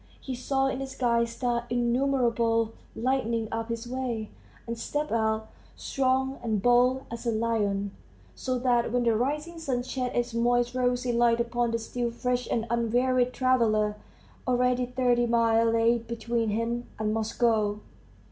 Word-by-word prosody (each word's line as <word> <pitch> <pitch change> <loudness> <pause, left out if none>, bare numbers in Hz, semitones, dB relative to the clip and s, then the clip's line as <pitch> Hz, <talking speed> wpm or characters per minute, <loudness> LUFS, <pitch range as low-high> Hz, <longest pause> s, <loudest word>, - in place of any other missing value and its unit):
He 265 - -5
saw 270 +2 0
in 270 -1 -1
the 270 - -3
sky 235 -3 +1
stars 235 +1 -2
innumerable, 235 -2 +1 0.2
lighting 235 -2 0
up 225 0 -3
his 230 0 -4
way, 245 -4 -3 0.3
and 235 - -3
stepped 295 +6 -3
out, 220 -1 0 0.3
strong 265 0 0
and 220 -3 0
bold 245 +4 +3
as 235 +1 -5
a - - +3
lion, 210 -3 0 0.4
so 255 -1 -2
that 245 -2 +1
when 245 0 +1
the 230 -2 +3
rising 300 +8 -2
sun 260 -6 -1
shed 255 -1 -3
its 240 0 0
moist 240 +1 +2
rosy 250 0 0
light 235 0 +3
upon 240 0 0
the 230 - 0
still 235 +1 -3
fresh 245 +1 -2
and 225 -1 0
unwearied 245 +2 +2
traveller, 225 -5 +2 0.5
already 250 0 +2
thirty 245 -1 +2
miles 230 -1 +3
lay 230 +1 +3
between 230 0 -2
him 230 +3 -2
and 215 0 -1
Moscow. 220 -1 +1
240 Hz, 150 wpm, -27 LUFS, 230-250 Hz, 0.5 s, bold